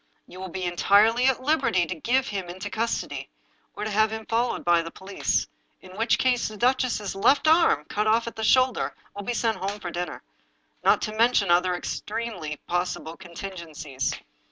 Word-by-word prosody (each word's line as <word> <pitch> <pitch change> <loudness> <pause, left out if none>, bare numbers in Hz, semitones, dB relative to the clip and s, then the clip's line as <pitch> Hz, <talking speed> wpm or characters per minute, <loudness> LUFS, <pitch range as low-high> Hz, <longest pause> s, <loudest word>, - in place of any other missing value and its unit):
You 185 - -12
will 190 0 -6
be 185 +2 -5
entirely 205 +7 +4
at 260 -1 +1
liberty 260 - +2
to 160 - -4
give 255 - 0
him 195 -4 -4
into 185 +2 -6
custody, 230 +1 -2 0.5
or - - -5
to 215 - -3
have 215 +1 +3
him 220 0 -5
followed 235 +3 -1
by 175 -1 +4
the 165 - -6
police, 190 +3 -1 0.3
in 185 0 -14
which 225 +3 +2
case 250 -2 +2
the 215 - -8
duchess's 245 -3 +1
left 275 +10 +3
arm, 315 - +4
cut 210 +6 -1
off 225 +2 +3
at 230 - -6
the 220 - -4
shoulder, 255 +2 +3 0.2
will 200 - -5
be 235 +4 -3
sent 225 -2 0
home 200 +2 -4
for 175 -3 -5
dinner 175 +1 -5 0.3
— - - -42
not - - +4
to 215 -1 -3
mention 225 -4 +3
other 180 +1 +3
extremely 185 -5 -4
possible 175 -2 -2
contingencies. 165 -7 -5
205 Hz, 185 wpm, -25 LUFS, 175-230 Hz, 0.5 s, entirely